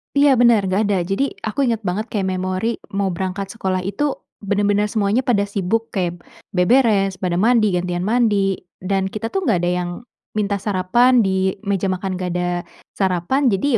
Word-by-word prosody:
Iya 280 -3 +5
benar 235 -4 +5
enggak 190 +3 +1
ada. 200 -2 +1
Jadi, 200 +10 -1
aku 245 +5 0
inget 225 -2 0
banget 200 +5 -2
kayak 195 -3 -2
memori 185 +5 -2 0.2
mau 195 -2 0
berangkat 190 +2 -4
sekolah 190 -5 -2
itu 265 +9 -1 0.2
benar-benar 205 0 +1
semuanya 215 +4 0
pada 205 -5 +2
sibuk 210 +4 -1
kayak 175 -3 -2 0.3
beberes, 195 -1 +3
pada 180 -2 -1
mandi, 215 0 +3
gantian 180 0 -2
mandi, 205 -4 +1 0.2
dan 190 0 -1
kita 215 +1 -3
tuh 385 -1 0
enggak 215 - +2
ada 175 - +1
yang 175 - -4 0.5
minta 200 -1 0
sarapan. 220 +6 +3
Di 190 0 0
meja 195 -1 0
makan 185 0 -3
enggak 180 -1 -3
ada 175 0 -1 0.5
sarapan, 195 +9 +1
jadi 195 +9 0
200 Hz, 170 wpm, -20 LUFS, 185-225 Hz, 0.5 s, Iya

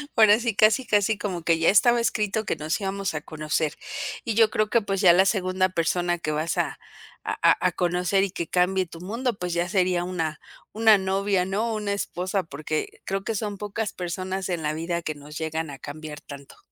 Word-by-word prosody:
Ahora 215 -1 +6
sí, 235 -3 -1
casi 215 +5 +4
casi 210 0 +2
como 185 -5 -4
que 165 0 +2
ya 165 - +4
estaba 240 +4 +5
escrito 220 -2 0
que - - -1
nos 155 +5 -2
íbamos 195 -1 -2
a 155 - -3
conocer. 155 0 -2 0.5
Y 225 -3 -2
yo 225 -1 +5
creo 215 -1 0
que 235 - +3
pues 195 -1 -2
ya 180 -4 +7
la 190 +2 +5
segunda 185 -2 +1
persona 175 0 0
que 155 -2 -3
vas 155 +2 -1
a - - -1 0.4
a - - -2
a - - +4
a - - 0
conocer 180 +2 +1
y 195 - -1
que 170 -2 -4
cambie 185 +2 +2
tu 165 -1 -12
mundo, 230 +4 -2
pues 180 -2 -3
ya 175 +1 0
sería 180 -2 +1
una 165 -4 -3 0.3
una 220 -1 +5
novia, 190 0 0
¿no?, 215 +5 -1
una 210 -2 -2
esposa, 185 -1 -2
porque 155 0 -4
creo 195 0 -2
que 225 - -2
son 205 -1 -3
pocas 210 +1 -3
personas 185 +2 -4
en 175 -2 -2
la 150 0 0
vida 170 +2 -2
que 155 -2 -4
nos 145 +1 -10
llegan 160 0 -3
a 135 -2 -9
cambiar 150 0 -8
tanto. 140 -1 -11
185 Hz, 210 wpm, -25 LUFS, 165-205 Hz, 0.5 s, ya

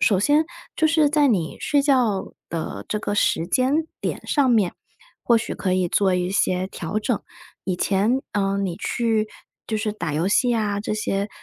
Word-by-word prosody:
首 195 -4 +4
先 295 +6 +4 0.3
就 315 - +3
是 310 -2 +4
在 300 -2 +4
你 180 -9 0
睡 285 -1 +2
觉 245 -9 +1 0.2
的 165 -1 -4
这 210 - -1
个 205 - -2
时 170 -4 +1
间 265 - +1
点 - - -4
上 280 -4 +2
面， 210 -7 +3 0.5
或 235 - +4
许 225 - -2
可 185 -2 -1
以 185 -1 +1
做 190 0 +2
一 180 0 0
些 185 -1 +1
调 190 +2 -3
整， 215 0 -1 0.4
以 185 -2 -1
前， 210 +9 +1
呃， 195 -1 0
你 190 -4 -1
去 225 -2 0 0.4
就 220 - -1
是 215 -1 -1
打 170 -8 -4
游 165 +4 0
戏 245 +4 +3
啊 205 -2 0
这 215 - -2
些， 200 -1 -1
210 Hz, 200 characters per minute, -23 LUFS, 190-245 Hz, 0.5 s, 首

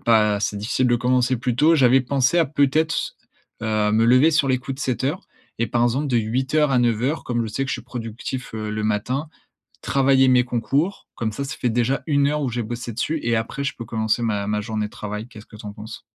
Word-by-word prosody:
pas 105 -3 +3
c'est 105 - -1
difficile 115 +5 0
de 120 0 +3
commencer 125 +1 +1
plus 120 0 -2
tôt. 160 +4 +5
J'avais 130 -2 +5
pensé 135 +4 +1
à, 170 - +5
peut-être, 155 +3 +2
s - - -3 0.5
heu, 105 -1 +1
me 110 +1 +3
lever 130 +7 +5
sur 145 -3 +2
les 130 - +2
coups 130 +2 -6
de 135 - -10
7:00 135 - -1 0.4
et 115 - +1
par 120 - 0
exemple, 130 +5 +1
de 125 -3 +1
8:00 130 +7 +1
à 130 - +3
9:00, 120 +5 0
comme 120 -1 -1
je 110 - -3
sais 135 - -1
que 135 - -7
je - - -1
suis 120 - -7
productif, 120 +1 -6
heu, 110 -1 -4
le 105 0 -3
matin, 125 +8 -1 0.5
travailler 135 -1 +3
mes 125 -1 +5
concours, 135 - -1
comme 110 -2 -2
ça, 140 +7 -4
ça 135 - -5
fait 125 - 0
déjà 120 +4 0
1 140 -2 +3
heure 150 +1 0
où 130 - -1
j'ai 120 0 -3
bossé 120 +1 -5
dessus 155 +8 -2
et, 115 0 +1
après, 115 +5 -3
je 140 - -2
peux 115 - -6
commencer 110 +1 -1
ma 105 -3 -1
ma 105 0 0
journée 110 -1 -3
de - - -19
travail. 105 +2 -6
Qu'est-ce 110 -3 -13
que 110 - -15
tu 105 - -11
en 100 - -6
penses? 110 +1 -9
120 Hz, 245 wpm, -22 LUFS, 110-135 Hz, 0.5 s, tôt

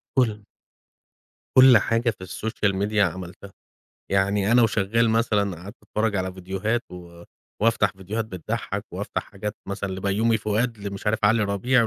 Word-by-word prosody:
كل 110 -5 +2 1.2
كل 130 -3 +9
حاجة 115 +3 +1
في 95 - -12
الSocial 100 +2 -2
Media 110 +1 -2
عملتها، 95 +1 -2 0.6
يعني 100 +2 +2
أنا 120 0 +6
وشغال 110 +1 +2
مثلًا 105 -5 +1
قعدت 100 - -9
أتفرج 110 -1 -1
على 95 0 -2
فيديوهات 95 +5 -2
و 85 -1 -11 0.4
وأفتح 115 0 +3
فيديوهات 105 +4 -3
بتضحّك 95 -7 -4
وأفتح - - -3
حاجات 105 +2 -6
مثلًا 100 0 -3
لبيومي 100 +4 +1
فؤاد 110 +2 -1
لمش 100 0 -6
عارف 110 +1 +2
علي 110 +2 +4
ربيع 115 +5 +2
105 Hz, 140 wpm, -24 LUFS, 95-115 Hz, 1.2 s, كل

